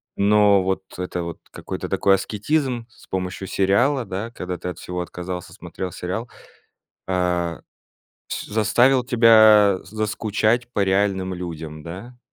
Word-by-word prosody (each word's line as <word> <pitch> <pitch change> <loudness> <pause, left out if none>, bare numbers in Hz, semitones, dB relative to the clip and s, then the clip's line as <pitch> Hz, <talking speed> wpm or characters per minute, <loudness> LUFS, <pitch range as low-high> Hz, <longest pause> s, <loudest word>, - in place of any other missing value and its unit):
но 100 -1 +4
вот 95 0 -1
это 90 -1 -3
вот 85 0 -6
какой-то - - -6
такой 95 - +3
аскетизм, 120 +4 -1
с - - -20
помощью 95 +1 -4
сериала, 115 +9 +2
да, 100 +5 -5
когда 90 -5 -5
ты 90 - -5
от 90 - -7
всего 90 0 -4
отказался, 90 0 -6
смотрел 95 -1 -7
сериал, 110 +9 -4 0.8
э, 90 -2 0 0.7
с - - -4
заставил 120 +4 +3
тебя 110 -5 +6
заскучать 110 +3 -1
по 100 - +2
реальным 95 -1 +1
людям, 80 -3 -7
да? 100 +10 -9
100 Hz, 130 wpm, -22 LUFS, 90-110 Hz, 0.8 s, тебя